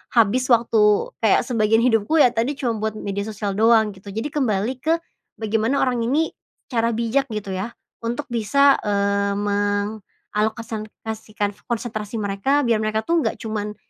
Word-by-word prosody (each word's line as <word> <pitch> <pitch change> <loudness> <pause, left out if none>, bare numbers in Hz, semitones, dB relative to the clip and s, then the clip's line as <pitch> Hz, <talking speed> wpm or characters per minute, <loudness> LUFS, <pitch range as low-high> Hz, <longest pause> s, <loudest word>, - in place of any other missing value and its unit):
habis 240 +3 +3
waktu 230 - +3
kayak - - +3
sebagian 225 -2 +2
hidupku 225 +4 +2
ya 245 - +5
tadi 240 +5 -1
cuman 235 -5 -2
buat 215 0 -2
media 200 0 -4
sosial 210 -1 -3
doang 220 +1 +4
gitu. 195 +1 -16
Jadi 225 +9 -4
kembali 245 -2 0
ke 320 +5 +2 0.4
bagaimana 225 +4 0
orang 250 -2 +1
ini 280 +8 +1 0.4
secara 230 -1 +1
bijak 235 +4 0
gitu 210 -4 -5
ya 190 +5 -4 0.2
untuk 240 +5 -3
bisa, 270 +5 +4
eee, 200 0 +1
mengalokasikan 210 +1 -3 0.2
konsentrasi 220 -2 -4
mereka 205 +9 +1
biar 230 -3 +2
mereka 215 0 -1
tuh 335 +6 +2
nggak - - -1
cuman 210 -2 -4
220 Hz, 145 wpm, -22 LUFS, 210-240 Hz, 0.4 s, ya